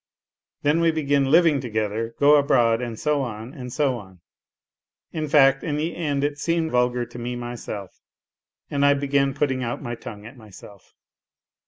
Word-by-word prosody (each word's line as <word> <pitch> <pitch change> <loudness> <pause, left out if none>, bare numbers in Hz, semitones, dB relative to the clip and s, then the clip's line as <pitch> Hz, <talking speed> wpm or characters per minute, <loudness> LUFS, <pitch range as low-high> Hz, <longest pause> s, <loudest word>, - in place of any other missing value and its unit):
" - - -68
Then 150 +3 +2
we 165 - +4
begin 145 -3 +1
living 160 -3 +4
together, 110 -1 -3
go 145 +1 +6
abroad 120 -5 +3
and 120 -3 -5
so 150 -2 +1
on, 115 0 -6
and 125 -2 -8
so 130 -3 0
on. 95 -3 -15 0.9
In 155 -2 -3
fact, 135 -2 +4
in 150 -3 -2
the 160 +3 -2
end 145 -4 -1
it 145 0 -2
seemed 165 0 0
vulgar 125 0 +1
to 120 - -11
me 120 +1 -4
myself, 120 -5 -7 0.7
and 140 -1 0
I 140 0 +5
began 140 -1 0
putting 135 -3 0
out 120 0 -3
my 120 -2 -4
tongue 105 -3 -9
at 115 +4 -11
myself. 105 -3 -15
135 Hz, 175 wpm, -23 LUFS, 120-145 Hz, 0.9 s, go